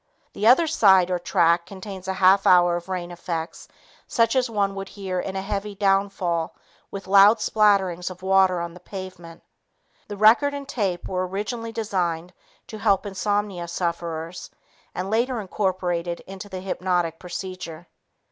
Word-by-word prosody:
The 210 - 0
other 260 +8 +6
side 190 - +4
or 180 - 0
track 170 -1 +2
contains 190 -1 -9
a 190 - -2
half 190 +1 +5
hour 175 -1 +5
of 175 +2 -6
rain 180 -2 -4
effects 170 -1 -5 0.4
such 230 +1 +2
as 255 -2 +2
one 200 -3 0
would 195 0 -6
hear 190 -3 -4
in 190 +1 -4
a 190 - -3
heavy 205 0 -4
downfall 195 -4 0 0.3
with 195 -1 -7
loud 200 +3 +6
splatterings 200 -5 +2
of 185 0 -11
water 190 -1 +3
on 170 0 -5
the 180 - -13
pavement. 185 -3 -9 0.6
The 205 - -7
record 235 +7 +5
and 280 -1 -7
tape 200 -9 -2
were 185 0 -2
originally 225 +5 -4
designed 180 -6 -2 0.3
to 215 - -9
help 200 -2 +2
insomnia 205 -2 -2
sufferers 170 -1 -4 0.5
and 185 +2 -4
later 240 +2 +1
incorporated 180 -4 -2
into 195 +2 -10
the 185 -1 -6
hypnotic 180 -3 -1
procedure. 180 -2 -7
190 Hz, 155 wpm, -24 LUFS, 175-205 Hz, 0.6 s, other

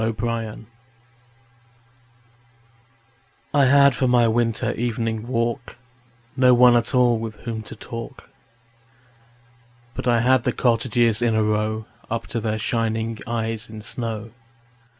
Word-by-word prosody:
Good 110 +1 -2
Hours 115 -2 -3 3.0
I 140 -2 +4
HAD 140 +1 +6
for 130 - 0
my 120 -1 +4
winter 115 0 0
evening 115 -1 -3
walk 120 -1 -2 0.6
No 125 -2 +5
one 125 0 +6
at 120 +1 +1
all 120 -2 +4
with 110 -1 -5
whom 115 -2 -4
to 110 - -10
talk, 120 +4 -9 1.6
But - - -5
I 120 -1 +3
had 130 0 +3
the - - 0
cottages 120 -2 +1
in 115 -2 +2
a 110 - +2
row 110 +1 -1 0.2
Up 115 0 -3
to 115 - 0
their 110 -1 -2
shining 115 0 -2
eyes 115 -1 -3
in 110 -1 -9
snow. 115 -1 -4
115 Hz, 130 wpm, -22 LUFS, 110-120 Hz, 3.0 s, HAD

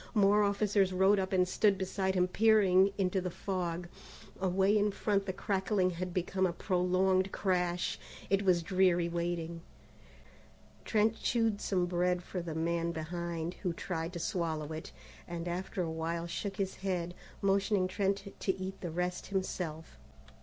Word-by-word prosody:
More 205 0 +5
officers 200 -1 +2
rode 190 +2 +4
up 190 0 -2
and 180 -1 +3
stood 200 +1 +3
beside 190 0 -1
him 180 0 +3
peering 200 -2 +5
into 190 -1 +1
the 180 - -2
fog. 175 -2 -3 0.5
Away 190 +2 +2
in 210 0 +3
front 200 0 0
the - - 0
crackling 190 0 0
had 180 +1 -4
become 185 +1 0
one 175 - 0
prolonged 185 +1 +1
crash. 180 -2 0 0.3
It 195 0 +2
was 180 -4 +3
dreary 180 -1 +3
waiting. 170 -1 -3 1.2
Trent 220 +1 +2
chewed 225 -3 +1
some 180 -3 +1
bread 180 0 0
for 180 - -4
the 165 -2 -5
man 170 +1 0
behind, 170 +1 -4
who 180 -4 -1
tried 165 0 -4
to 170 - -4
swallow 160 -4 -2
it, 155 - -7 0.4
and 170 0 -5
after 180 +1 -2
a 165 - -3
while 165 +1 -2
shook 195 +3 -4
his 195 -1 -2
head, 180 -3 -2 0.3
motioning 195 -1 +2
Trent 195 +1 -1
to 190 - 0
eat 190 +1 -5
the 175 - -3
rest 180 +2 -2
himself. 180 -5 -4
185 Hz, 155 wpm, -32 LUFS, 175-195 Hz, 1.2 s, More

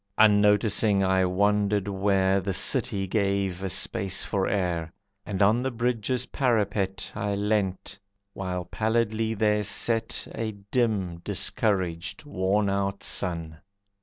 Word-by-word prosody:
Unnoticing, 105 -1 +4
I 95 0 +2
wandered 100 +1 +1
where 95 -1 +2
The 95 0 -2
city 95 -1 +1
gave 100 -2 -1
a 95 - -2
space 95 +1 +1
for 95 -2 -1
air, 85 -5 -1 0.4
And 100 -1 0
on 110 +4 +3
the 130 - -1
bridge's 125 +1 -1
parapet 100 -6 -1
I 100 0 -2
leant, 100 -1 -1 0.3
while 90 -2 -4
pallidly 110 +2 0
there 105 0 +2
set 115 +2 -1
A 110 -1 -3 0.2
dim, 100 -8 0
discouraged, 95 - -2
worn 100 -4 0
out 100 0 -1
sun. 85 -4 -1
100 Hz, 120 wpm, -26 LUFS, 95-110 Hz, 0.4 s, Unnoticing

